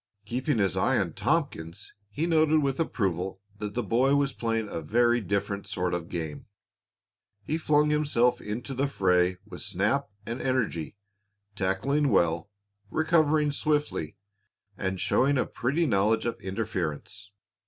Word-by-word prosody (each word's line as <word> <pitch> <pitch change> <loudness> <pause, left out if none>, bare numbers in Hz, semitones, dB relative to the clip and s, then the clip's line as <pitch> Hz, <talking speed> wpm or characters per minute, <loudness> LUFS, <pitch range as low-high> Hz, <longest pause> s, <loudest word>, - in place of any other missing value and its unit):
Keeping 125 +4 -1
his 100 -4 +2
eye - - +2
on - - 0
Tompkins, 105 - -2 0.2
he 150 +9 -2
noted 155 -2 +3
with 135 -1 -1
approval 95 - -1 0.2
that 105 0 -5
the 120 - 0
boy 130 +4 +3
was 140 -1 +1
playing 115 -2 -1
a 85 - -4
very 120 +7 +3
different 100 0 -2
sort 90 -1 -2
of 85 -1 -3
game. 80 -4 -5 1.0
He 155 +7 -2
flung 150 -1 +3
himself 125 -5 +2
into 115 +6 -5
the 135 +2 0
fray 90 -7 +2
with 105 - -9
snap 110 +10 0 0.2
and 120 +3 -4
energy, 115 -10 -1 0.6
tackling 135 +10 +1
well, 85 -2 +2 0.4
recovering 155 -1 +3
swiftly, 145 - -1 0.6
and 95 0 -2
showing 140 +8 +2
a 125 - +2
pretty 140 +8 0
knowledge 110 -2 +2
of 120 - -3
interference. 95 -1 -4
115 Hz, 140 wpm, -28 LUFS, 95-140 Hz, 1.0 s, noted